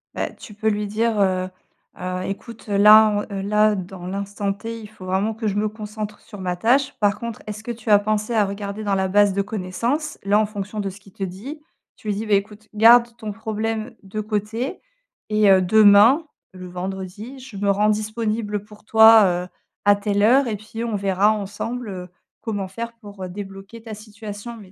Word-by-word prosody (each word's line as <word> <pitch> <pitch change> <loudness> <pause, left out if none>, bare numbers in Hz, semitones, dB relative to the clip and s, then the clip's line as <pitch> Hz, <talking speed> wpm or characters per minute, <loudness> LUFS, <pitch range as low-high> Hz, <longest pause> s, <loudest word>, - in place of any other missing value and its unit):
Bah, - - -2
tu 210 - -13
peux 220 +1 0
lui 210 -1 -1
dire, 220 +1 0
heu 185 -1 +1 0.5
heu: 185 0 -3
«Écoute, 220 +4 -7
là, 210 +2 +7 0.2
en - - -8
heu, 195 - -3
là, 210 +1 +3
dans 185 -1 -7
l'instant 200 +1 -3
T, 230 +3 -7
il 210 - -9
faut 210 -3 -12
vraiment 195 +4 0
que 220 0 -4
je 200 - -1
me 210 +1 +1
concentre 210 0 -7
sur 205 - -12
ma 180 -1 -2
tâche. 265 +8 +2
Par 205 0 +2
contre, 235 -2 -6
est-ce 215 0 -7
que 240 - -4
tu 230 0 -7
as 205 - +8
pensé 215 +2 -1
à 215 -2 +3
regarder 200 +1 -5
dans 200 -1 0
la 190 0 +1
base 205 +1 +4
de 200 - +1
connaissances?» 230 +10 -3
là, 200 +2 +3
en 215 - +3
fonction 205 0 -6
de 200 - -2
ce 195 +2 -12
qu'il 195 -1 -19
te 195 - -5
dit, 215 - -7 0.3
tu - - -13
lui 205 - 0
dis: 220 - -4
«Beh 210 -2 +4
écoute, 210 +2 -7
garde 235 +2 +6
ton 215 -2 -5
problème 220 +2 -3
de 195 +3 -6
côté, 215 +4 -3 0.5
et 210 -1 +4
heu, 190 -1 +6
demain, 215 - +6 0.3
le 185 -1 -9
vendredi, 190 +7 -6
je 255 -5 -10
me 200 +1 0
rends 205 +2 +3
disponible 215 -1 -2
pour 210 0 -16
toi, 220 0 +8
heu, 180 -1 0 0.4
à 205 0 +6
telle 205 0 0
heure 255 +5 +5
et 220 - -1
puis 220 +2 -7
on 230 -2 -2
verra 195 +1 +2
ensemble, 215 +3 -4
heu, 180 -2 -7 0.3
comment 205 -4 -3
faire 230 +4 -6
pour, 205 -4 -11
heu, 185 - -5
débloquer 195 +3 -9
ta 225 -2 -7
situation.» 215 +1 -9
mais 195 -3 -14
210 Hz, 210 wpm, -22 LUFS, 200-220 Hz, 0.5 s, as